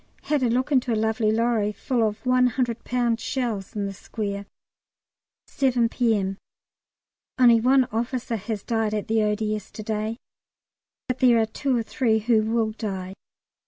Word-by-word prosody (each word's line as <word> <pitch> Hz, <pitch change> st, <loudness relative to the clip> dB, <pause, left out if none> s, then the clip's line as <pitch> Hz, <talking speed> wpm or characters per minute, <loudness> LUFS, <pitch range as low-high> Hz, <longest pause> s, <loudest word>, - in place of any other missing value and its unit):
Had 295 Hz, -2 st, 0 dB
a 250 Hz, -, +2 dB
look 255 Hz, +5 st, 0 dB
into 255 Hz, -3 st, +2 dB
a -, -, +2 dB
lovely 220 Hz, 0 st, +1 dB
lorry 225 Hz, -2 st, +1 dB
full 245 Hz, +3 st, -2 dB
of 215 Hz, +2 st, -1 dB
100 250 Hz, -2 st, +1 dB
lb. 240 Hz, -2 st, 0 dB
shells 225 Hz, -5 st, -3 dB
in 205 Hz, -1 st, -1 dB
the 195 Hz, -, -4 dB
square. 200 Hz, 0 st, -5 dB, 1.0 s
7 245 Hz, -4 st, +1 dB
P.M. 205 Hz, -6 st, 0 dB, 1.0 s
Only 240 Hz, -2 st, +6 dB
one 260 Hz, +2 st, +4 dB
officer 235 Hz, +1 st, -2 dB
has 210 Hz, 0 st, -5 dB
died 225 Hz, -2 st, 0 dB
at 210 Hz, -, -3 dB
the 220 Hz, 0 st, +2 dB
O.D.S. 210 Hz, -1 st, -1 dB
to 215 Hz, -, -8 dB
day, 215 Hz, +1 st, -2 dB, 0.9 s
but 255 Hz, -1 st, -2 dB
there 245 Hz, -2 st, +5 dB
are 220 Hz, -, +3 dB
two 255 Hz, +4 st, -1 dB
or 230 Hz, -, 0 dB
three 225 Hz, -2 st, +1 dB
who 220 Hz, 0 st, +2 dB
will 220 Hz, 0 st, 0 dB
die. 190 Hz, -4 st, -5 dB
225 Hz, 160 wpm, -24 LUFS, 215-245 Hz, 1.0 s, Only